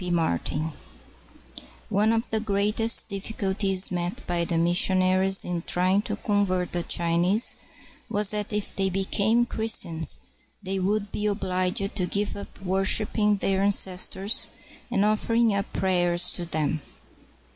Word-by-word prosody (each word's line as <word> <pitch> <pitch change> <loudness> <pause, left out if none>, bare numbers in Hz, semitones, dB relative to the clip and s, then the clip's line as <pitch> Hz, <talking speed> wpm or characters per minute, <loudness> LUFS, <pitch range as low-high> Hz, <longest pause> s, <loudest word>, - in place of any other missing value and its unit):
P. 180 - -4
MARTIN 160 - -1 1.2
[One 210 +1 +2
of 230 0 0
the 220 - +1
greatest 210 +2 +1
difficulties 195 -2 -1
met 180 +7 -4
by 175 -1 -1
the 170 0 -1
missionaries 185 +2 +3
in 175 -1 -3
trying 185 +4 +1
to - - -4
convert 195 -4 0
the 175 - 0
Chinese 175 +6 +1 0.5
was 210 -2 +1
that 210 -1 -3
if 210 -1 -3
they 195 -1 +1
became 200 +5 +1
Chris 225 -1 0
tians, 160 -2 +1 0.5
they 190 0 -2
would 205 +2 -1
be 210 - -2
obliged 190 -1 -1
to 185 - +1
give 200 +3 -1
up 200 - -10
worshiping 205 +2 +1
their 195 0 0
an 200 - +3
cestors 190 +1 +2 0.4
and 200 +1 +1
offering 225 +1 +2
up 200 0 -2
prayers 175 -2 +1
to 175 - -4
them. 155 -1 -2
195 Hz, 140 wpm, -25 LUFS, 180-210 Hz, 1.2 s, missionaries